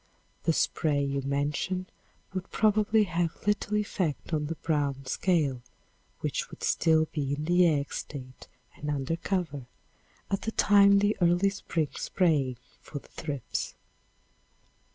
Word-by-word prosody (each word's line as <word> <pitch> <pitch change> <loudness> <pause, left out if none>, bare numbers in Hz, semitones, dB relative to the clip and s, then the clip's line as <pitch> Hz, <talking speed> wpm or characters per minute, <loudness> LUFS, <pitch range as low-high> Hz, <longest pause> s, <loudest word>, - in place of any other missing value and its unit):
The 165 - +4
spray 145 -2 +1
you 140 0 -1
mention 145 +7 -1 0.5
would 185 0 -4
probably 215 0 +3
have 175 -3 -2
little 210 0 +1
effect 185 -7 -2
on 150 -1 0
the 165 - -3
brown 145 -4 -1
scale 140 -3 +1 0.6
which - - -2
would - - -11
still 160 -1 +3
be 140 -2 -1
in 150 +1 -4
the 175 +1 +5
egg 145 -3 0
state 130 -3 -7 0.3
and 150 - -5
under 145 +2 -1
cover, 165 -7 -2 0.6
at 195 - 0
the 225 - -3
time 200 -1 +6
the 205 +1 +3
early 175 +3 +4
spring 165 -6 -2
spraying 145 -9 +1 0.2
for 145 - -8
the 140 - -10
thrips. 145 -6 -4
160 Hz, 135 wpm, -29 LUFS, 140-190 Hz, 0.6 s, time